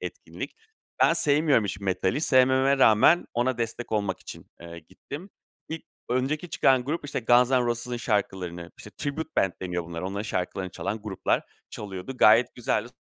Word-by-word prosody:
etkinlik. - - -7 0.5
Ben - - +6
sevmiyorum 145 -5 +3
hiç 100 -1 -4
metali. 95 +6 0
Sevmememe 130 -1 +4
rağmen, 115 +9 +5
ona 120 +1 0
destek 115 0 -4
olmak 100 -4 -1
için, - - -10
eee, 85 0 -9
gittim. 145 - -10 0.4
İlk 160 0 -5 0.3
önceki 140 +7 -1
çıkan 130 -4 +3
grup, 150 +5 -3
işte 145 -3 -3
Guns'n'Roses'ın 120 0 +2
şarkılarını 95 -6 -2
-işte 105 - -11
Tribute 155 +2 -3
Band 95 - +2
deniyor 90 -2 -3
bunlara 85 +2 -5
onların 100 +1 -4
şarkılarını 95 -2 -3
çalan 100 +7 -4
gruplar 105 -3 -1 0.3
çalıyordu. 100 +5 -7
Gayet 115 +2 +5
güzeldi. 120 -2 -1
115 Hz, 145 wpm, -26 LUFS, 95-130 Hz, 0.5 s, Ben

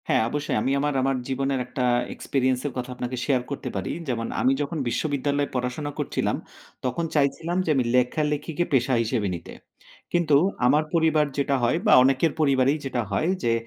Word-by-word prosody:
হ্যাঁ, - - +3
অবশ্যই 145 +2 -2
আমি 135 - 0
আমার 145 +1 0
আমার 135 +1 +1
জীবনের 135 0 -1
একটা 125 +1 -3 0.3
এক্সপেরিয়েন্সের 130 +1 -1
কথা 125 0 -4
আপনাকে 125 +1 -4
শেয়ার 130 -4 +2
করতে 135 -2 -4
পারি 95 - -2 0.2
যেমন 115 -3 -2
আমি 130 - +4
যখন 145 +3 -3
বিশ্ববিদ্যালয়ে 145 +2 -1
পড়াশোনা 125 +4 -2
করছিলাম, - - -1 0.5
তখন 130 +7 -1
চাইছিলাম 155 +4 +1
যে - - -2
আমি 130 - +2
লেখালেখিকে 150 +5 0
পেশা 130 0 +2
হিসেবে 110 -2 -1
নিতে। 85 - -9 0.6
কিন্তু 170 -4 +3 0.3
আমার 145 +5 +4
পরিবার 160 -2 +3
যেটা 140 0 +1
হয় 120 - +2
বা 210 - +6
অনেকের 135 +4 +3
পরিবারেই 140 -1 +3
যেটা 130 -2 -1
হয় 155 - +1
যে 115 -1 +2
135 Hz, 165 wpm, -25 LUFS, 125-150 Hz, 0.6 s, বা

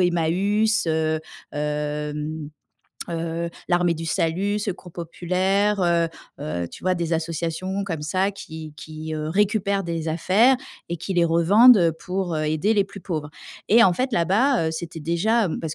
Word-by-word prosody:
Emmaüs, 190 +6 +2
heu, 160 -1 0 0.3
hem, 150 +1 -3 0.6
heu, 165 0 -2 0.2
l'Armée 175 -1 +2
du 165 0 -6
Salut, 185 +6 0
Secours 190 -4 -5
Populaire, 185 +4 0
heu 170 -1 +2 0.4
heu, 85 - -3
tu - - -12
vois, 185 - +2
des 170 -1 -2
associations 170 +4 -2
comme 165 -6 -4
ça 185 +6 0
qui 160 -5 -9
qui, 155 0 -7
heu, 155 0 -3
récupèrent 200 +1 +1
des 165 -1 -3
affaires 200 +11 +4 0.3
et 170 - -1
qui 190 +4 -4
les 175 -1 +4
revendent 170 +3 +6
pour, 185 -2 -3
heu, 155 - -1
aider 155 +8 +1
les 200 -2 +3
plus 200 0 -11
pauvres. 155 -4 -4 0.4
Et 235 +2 +7
en 185 - +5
fait, 255 +7 -1
là-bas, 210 - +2
heu, - - -1
c'était 165 0 -6
déjà, 190 +7 +1
heu - - -3
parce 160 -2 -4
170 Hz, 160 wpm, -23 LUFS, 160-195 Hz, 0.6 s, Et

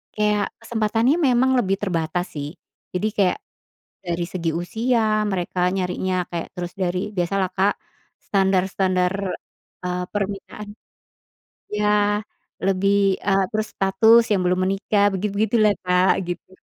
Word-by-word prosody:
kayak 210 -1 +2 0.2
kesempatannya 230 +3 +1
memang 255 +1 +3
lebih 195 -4 0
terbatas 175 -2 -1
sih. 145 -1 -4 0.4
Jadi 180 +4 0
kayak 195 -3 +3 0.7
dari 170 0 -1
segi 170 -3 -1
usia 230 +6 0 0.3
mereka 180 -1 -3 0.2
nyarinya, 185 0 -1 0.2
kayak, 170 -1 -4
terus 175 0 -4
dari 180 0 0 0.2
biasalah 185 +1 0
Kak, 195 +2 +3 0.5
standar-standar, 190 -1 +1 0.7
eee 180 0 -2
permintaan, 205 +1 -4 1.0
iya, 210 0 0 0.8
lebih, 195 +1 +2 0.3
eee, 195 -1 +3
terus 215 0 -1
status 220 +4 +5
yang 200 - +2
belum 180 +1 +1
menikah, 200 +1 +1
begitu-begitulah 210 +2 +2
Kak, 180 +1 +4 0.2
gitu. 175 +1 -6
195 Hz, 115 wpm, -22 LUFS, 180-210 Hz, 1.0 s, status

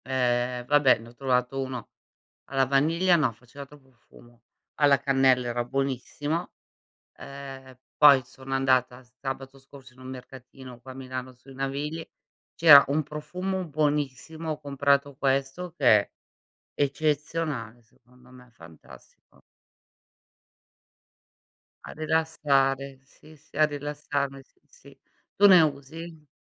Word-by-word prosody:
Ehm, 125 -1 -1
vabbè, 145 0 +4
ne 115 +1 -13
ho - - -17
trovato 130 0 -1
1 130 -1 -6 0.6
alla 135 -1 +1
vaniglia. 165 +7 +2
No, 155 -7 +2
faceva 125 +5 -12
troppo 140 -2 -19
fumo. 120 0 -21 0.4
Alla 145 -2 +5
cannella 135 -2 +2
era 120 0 -2
buonissimo, 135 +5 -3 0.7
ehm, 135 -2 -10 0.2
poi 140 -3 +7
sono 130 +1 -9
andata 130 -1 +1
sabato 135 +2 -8
scorso 135 -1 -16
in 125 - -22
un 130 - -11
mercatino, 130 -1 -11
qua 130 +1 -11
a - - -9
Milano 130 -1 -7
sui 130 +2 -17
Navigli, 145 +4 -4 0.5
c'era 150 -4 +9
un 150 +2 0
profumo 180 +6 -4
buonissimo, 150 +1 -2
ho 150 - -5
comprato 140 0 0
questo 135 +6 -1
che 140 - -3 0.2
è - - -14 0.6
eccezionale 145 -4 -2
secondo 125 +2 -24
me, 125 -1 -16
fantastico. 85 -6 -18 2.4
A - - -9
rilassare, 140 -4 0
sì, 150 +3 -19
sì 150 - -16
a 155 - +6
rilassarmi, 145 -2 -4
s - - -38
sì. 485 0 -18 0.4
Tu 205 - +6
ne 185 -3 +8
usi? 155 +2 -4
135 Hz, 125 wpm, -26 LUFS, 130-150 Hz, 2.4 s, c'era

